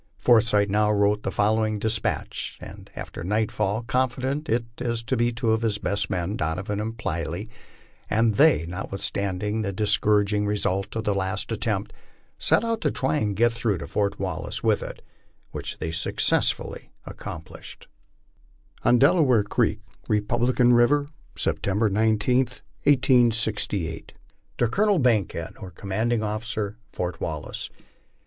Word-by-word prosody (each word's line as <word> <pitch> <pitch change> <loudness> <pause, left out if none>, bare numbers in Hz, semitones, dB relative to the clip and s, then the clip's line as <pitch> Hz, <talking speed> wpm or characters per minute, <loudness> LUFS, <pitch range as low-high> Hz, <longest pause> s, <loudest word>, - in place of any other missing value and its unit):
Forsyth 110 -4 +4
now 105 +1 +2
wrote 105 0 +2
the - - -2
following 110 +1 +1
despatch, 110 +1 -2
and - - -11
after - - -7
nightfall 105 +2 0
confided 130 +5 -1
it 115 -1 +1
to 115 -1 -2 0.3
two 115 -1 0
of 110 0 +1
his 110 -3 +1
best 100 0 -1
men, 90 +2 -2
Donovan 95 +6 -2
and 110 +2 -4
Plyley; 85 0 -3 0.6
and 110 +1 +3
they, 140 - +5
notwithstanding 100 +3 -2
the 100 -2 -2
dis 105 +2 +2
couraging 105 0 +2
result 100 -1 -1
of 110 - -2
the 105 - +1
last 95 +3 -2
attempt, 105 -3 -2 0.5
set - - +3
out 230 -1 -1
to 150 - +2
try 135 +3 0
and 105 -6 -1
get 120 +3 +3
through 115 -4 0
to 70 - -6
Fort 100 +7 -1
Wal - - -3
lace - - -5
with - - +2
it, - - -8 0.5
which - - -5
they 80 - -3
successfully 85 -6 0 0.2
accomplished: 80 - -9 0.9
ON 120 - +4
DELAWARE 135 - +4
CREEK, 100 - 0 0.3
REPUBLICAN 120 +4 +2
RIVER, 140 +5 +4 0.3
Sept. 105 +2 0
19, 110 +5 +2 0.4
18(58. 110 - +2 0.5
To 120 - +2
Colonel 205 - +2
Bankkead, 100 - 0
or 95 - -7
Commanding 110 +5 -1
Officer, 110 0 -3
Fort 90 -2 -4
Wallace. 75 -2 -4
105 Hz, 135 wpm, -25 LUFS, 100-120 Hz, 0.9 s, they